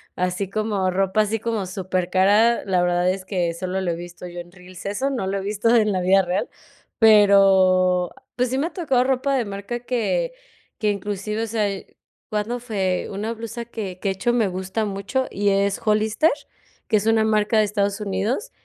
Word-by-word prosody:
así 180 +1 -2
como 205 -2 -1
ropa 195 +3 +1
así 215 +1 -1
como 225 -3 -2
supercara. 190 +4 +2
La 185 -2 +1
verdad 175 0 +2
es 185 0 -3
que 180 -3 -1
solo 185 +2 -3
lo 180 -2 -1
he - - -2
visto 175 +1 -9
yo 175 0 -8
en 175 0 -10
Reels, 180 0 -13
eso 205 +8 -1
no 245 -8 -2
lo 195 +1 -1
he - - -3
visto 210 +4 +1
en 215 -2 +3
la 185 -2 0
vida 190 +2 +4
real, 180 +1 -2 0.5
pero, 190 -4 +5 0.2
pues, 250 +1 0
sí 260 - -1
me 290 +4 0
ha - - -11
tocado 270 -9 +1
ropa 265 +1 0
de 250 -3 0
marca 200 +4 -5
que 255 - -1 0.5
que 215 -1 +1
inclusive, 205 +2 -3
o - - -3
sea, 220 -1 0 0.6
cuando 215 +3 -2
fue 195 -6 -2
una 210 +3 -3
blusa 230 +1 -6
que 205 -6 -7
que, 195 - -1
de - - 0
hecho, 240 +6 0
me 230 -4 +2
gusta 190 +4 -3
mucho 205 +6 -2
y 205 +1 -1
es 200 0 +1
Hollister, 215 +8 +2 0.6
que 215 - +4
es 205 - -2
una 225 -1 +4
marca 215 0 +2
de - - +5
Estados 200 0 -1
Unidos, 210 - -2
205 Hz, 195 wpm, -22 LUFS, 185-225 Hz, 0.6 s, pero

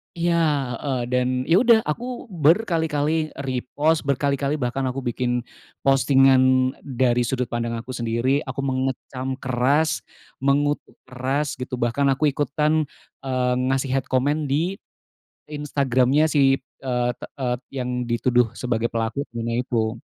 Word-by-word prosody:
Iya, 170 0 +1 0.5
heeh. 135 -3 -2
Dan, 125 0 +2 0.2
ya 170 +6 +4
udah, 235 -3 +6
aku 240 +7 -5
berkali-kali 160 -3 +1
repost, 140 +4 0
berkali-kali 140 +1 0
bahkan 130 -1 -2
aku 130 +1 -3
bikin 120 0 -1 0.4
postingan 130 -1 +4
dari 125 -2 +1
sudut 125 -2 -2
pandang 115 0 -2
aku 115 +3 -6
sendiri. 120 +3 0
Aku 135 +1 -4
mengecam 130 0 -2
keras, 135 +5 +2 0.4
mengutuk 145 +2 0
keras, 130 +3 -2
gitu, 125 0 -4
bahkan 125 +4 0
aku 140 +2 +2
ikutan, 150 +2 0 0.4
eee, 125 -1 +1
ngasih 135 0 0
hate 135 0 0
comment 140 +4 +1
di 165 +8 -1 0.7
Instagram-nya 140 0 +1
si, 135 -3 +3
eee, 125 -2 -3
te - - -8 0.2
eee, 125 -1 +1 0.3
yang 125 0 -2
dituduh 120 0 +1
sebagai 120 -2 -2
pelaku 115 +5 -1
bully-nya 115 +1 -2
itu. 110 -3 -1
130 Hz, 130 wpm, -23 LUFS, 125-145 Hz, 0.7 s, udah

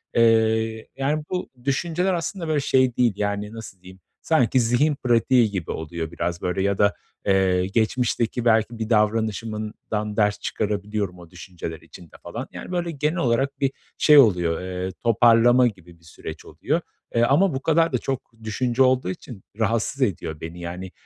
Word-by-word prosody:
Eee, 110 -1 +2
yani 150 +3 0
bu 180 -1 -3
düşünceler 170 +7 0
aslında 170 +1 -3
böyle 155 -2 +1
şey 130 -3 +2
değil, 120 -4 +3
yani, 105 +1 -2
nasıl 110 -5 -10
diyeyim, 95 0 -14 0.2
sanki 130 -5 +2
zihin 125 +6 +2
pratiği 120 -1 +3
gibi 95 -5 -4
oluyor 80 +1 -5
biraz 85 0 -3
böyle 90 +1 -1
ya 100 0 +1
da, 100 0 +3 0.3
eee, 95 -2 +2
geçmişteki 115 +2 0
belki 115 0 +2
bir 110 - -3
davranışımdan 110 -1 -1
ders 105 -1 +2
çıkarabiliyorum 105 -3 -3
o 85 -2 -13
düşünceler 85 -3 -8
içinde 85 -3 -15
falan. - - -6
Yani, - - -8
böyle 175 -2 -1
genel 150 +3 -1
olarak 135 0 0
bir 135 -1 +1 0.3
şey 150 -1 +6
oluyor, 90 -9 +4
eee, 90 0 -4
toparlama 120 +2 +5
gibi 90 -5 -9
bir - - -28
süreç 80 0 -9
oluyor. 150 - -2 0.3
Eee, 115 - +4
ama 160 +8 +3
bu 135 - -3
kadar 165 -1 +2
da - - +3
çok 130 0 -4
düşünce 120 +4 +1
olduğu 130 -6 +2
için 95 +2 -8 0.2
rahatsız 115 +5 0
ediyor 80 -9 -1
beni. 80 +2 -7
Yani, 90 +2 -6
110 Hz, 160 wpm, -23 LUFS, 95-130 Hz, 0.3 s, şey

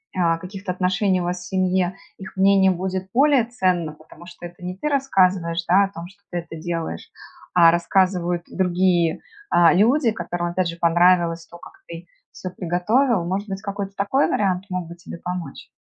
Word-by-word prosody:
а, 170 -3 +2
каких-то 190 +2 -6
отношений 185 +1 0
у - - -2
вас 180 +1 -2
в 180 - -9
семье, 185 -1 0 0.2
их 190 0 -10
мнение 195 0 +5
будет 185 +1 -3
более 275 -2 +4
ценно? 185 -9 -1
Потому 155 +2 -16
что 175 0 -11
это 175 +1 -12
не 180 +1 -5
ты 300 - -2
рассказываешь, 185 - +1
да, 190 +3 +5
о - - -7
том, 170 -2 -8
что 195 +2 -20
ты 175 - -3
это 165 -1 -9
делаешь, 165 - -5 0.5
а 170 -2 +7
рассказывают 175 0 +1
другие, 180 -2 +1 0.3
а, 170 -1 +5
люди, 230 - +3
которым, 175 -5 -4
опять 175 +1 -1
же, 170 0 -5
понравилось 170 0 +3
то, 175 - -13
как - - -13
ты 170 +1 -9 0.2
всё 185 - -7
приготовил. 185 +6 +1
Может 195 +4 -3
быть 195 -1 -5
какой-то 200 -1 -5
такой 205 +9 +1
вариант 190 -2 0
мог 180 -2 -3
бы 170 - -10
тебе 170 0 -10
помочь? 180 -5 -6
180 Hz, 180 wpm, -22 LUFS, 175-195 Hz, 0.5 s, а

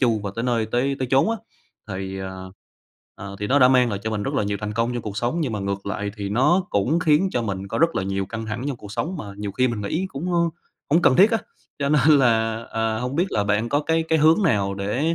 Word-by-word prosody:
chu 115 -5 +2
và 100 - -3
tới 115 - -2
nơi 115 -3 +1
tới 130 +4 0
tới 130 -2 -2
chốn 135 +11 +4
á. 230 - -1 0.5
Thì, 95 -1 -5
à, 95 0 -5 0.8
ờ, 100 0 -8
thì 105 - -1
nó 140 +5 +3
đã 125 - +7
mang 125 -2 +4
lại 100 - -2
cho 110 - -2
mình 105 -2 -2
rất - - -3
là - - +1
nhiều 100 0 -1
thành 105 0 -3
công 115 +2 0
trong 120 - -3
cuộc 105 -2 -6
sống, 120 +9 -1
nhưng 140 -8 -1
mà 105 - -2
ngược 100 0 -3
lại 100 0 -3
thì 100 -1 -4
nó 150 - +3
cũng 115 +12 +1
khiến 160 +4 +3
cho 120 - 0
mình 100 -2 -4
có - - -3
rất 165 +1 +3
là - - 0
nhiều 95 0 -2
căng 110 +1 -6
thẳng 110 +4 -4
trong 135 - -3
cuộc 105 -2 -11
sống 175 - -3
mà 150 - -6
nhiều 100 -1 -5
khi 130 +4 +2
mình 115 -3 -3
nghĩ 160 - -2
cũng, 170 +5 -4
ờ, 175 - +2 0.5
hổng 165 +4 +4
cần 130 - +5
thiết 200 +4 +6
á. 225 - +2 0.4
Cho 140 - 0
nên 150 0 +3
là, 115 -3 +2
ờ, 110 -1 -1
hông 125 +4 -3
biết 175 +3 +2
là 105 - +1
bạn 105 +3 0
có 145 - +1
cái 160 +2 +1
cái 160 - +3
hướng 160 +6 +4
nào 100 - +1
để 115 +12 -1
115 Hz, 275 wpm, -23 LUFS, 105-145 Hz, 0.8 s, đã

